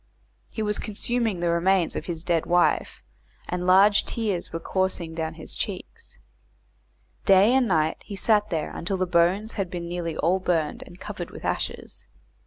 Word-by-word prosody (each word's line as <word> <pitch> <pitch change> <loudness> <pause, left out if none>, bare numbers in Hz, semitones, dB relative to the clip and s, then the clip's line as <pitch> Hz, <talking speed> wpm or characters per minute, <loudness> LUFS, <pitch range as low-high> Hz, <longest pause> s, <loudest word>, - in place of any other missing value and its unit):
He 220 - -4
was 210 -1 +1
consuming 225 -2 -1
the 175 - +1
remains 175 +1 +2
of - - -4
his 165 -2 -4
dead 170 -2 0
wife, 175 0 +1 0.4
and 180 0 -3
large 200 +3 +6
tears 205 -7 -2
were 165 - -3
coursing 185 -2 -1
down 160 -1 -3
his - - -6
cheeks. 460 0 -6 1.1
Day 195 +4 +6
and 260 -2 +3
night 160 -4 +1
he 205 - -7
sat 210 +1 +2
there 160 -4 -3
until 190 +3 -2
the 185 - +1
bones 180 +5 +2
had 195 -4 -2
been 175 -1 -5
nearly 170 -2 -4
all 180 +4 +2
burned 165 -5 -1
and 175 - -14
covered 195 -5 -6
with - - -10
ashes. - - -4
185 Hz, 170 wpm, -25 LUFS, 170-205 Hz, 1.1 s, large